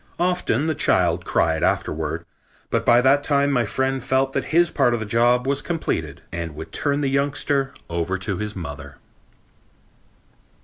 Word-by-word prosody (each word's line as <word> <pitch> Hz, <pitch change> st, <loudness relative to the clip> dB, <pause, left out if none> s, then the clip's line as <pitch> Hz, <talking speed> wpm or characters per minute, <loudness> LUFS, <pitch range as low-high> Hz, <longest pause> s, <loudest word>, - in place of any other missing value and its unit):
Often 175 Hz, -6 st, 0 dB
the 160 Hz, -, +1 dB
child -, -, +1 dB
cried 80 Hz, -1 st, +1 dB
afterward, 75 Hz, -1 st, -1 dB, 0.5 s
but -, -, +1 dB
by 120 Hz, 0 st, +5 dB
that 135 Hz, +3 st, +4 dB
time 140 Hz, -1 st, +2 dB
my 125 Hz, -4 st, +2 dB
friend 130 Hz, +3 st, -1 dB
felt 135 Hz, 0 st, +1 dB
that 135 Hz, -, -1 dB
his 170 Hz, +1 st, +3 dB
part 125 Hz, -4 st, +2 dB
of -, -, -3 dB
the 110 Hz, -, -4 dB
job 120 Hz, +3 st, +2 dB
was 140 Hz, +1 st, +1 dB
completed 80 Hz, -, -3 dB
and 85 Hz, -2 st, -5 dB
would 80 Hz, +1 st, -8 dB
turn 145 Hz, 0 st, 0 dB
the 140 Hz, -, +1 dB
youngster 140 Hz, 0 st, 0 dB, 0.2 s
over 85 Hz, +3 st, -2 dB
to 95 Hz, +1 st, -2 dB
her 105 Hz, -, -2 dB
mother. 80 Hz, -6 st, -7 dB
130 Hz, 165 wpm, -22 LUFS, 95-140 Hz, 0.5 s, by